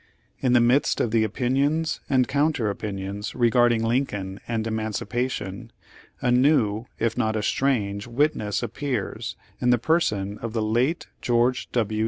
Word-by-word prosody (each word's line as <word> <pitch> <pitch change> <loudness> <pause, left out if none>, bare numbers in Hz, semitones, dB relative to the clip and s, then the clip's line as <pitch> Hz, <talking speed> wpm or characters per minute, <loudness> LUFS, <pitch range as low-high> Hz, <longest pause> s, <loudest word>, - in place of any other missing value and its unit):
In 125 -2 +2
the 120 - +6
midst 120 +4 +3
of 115 - 0
the 115 -1 +3
opinions 135 +8 0
and 130 -2 +3
counter 145 -6 +1
opin 100 0 -5
ions 100 +2 -5
regarding 120 -1 +3
Lincoln 105 -6 -1
and 115 -2 -1
emancipation, 110 0 -3 0.5
a 125 - +2
new, 120 -4 +3
if 115 0 0
not 110 0 +1
a 110 - -1
strange 105 -6 0
witness 120 -5 0
appears 120 -1 -3 0.2
in 125 - +1
the 125 - +5
person 105 - 0
of 115 -1 -5
the 110 -2 0
late 120 +9 +1 0.2
George 120 +1 +1
W. 110 -3 0
120 Hz, 150 wpm, -25 LUFS, 110-130 Hz, 0.5 s, the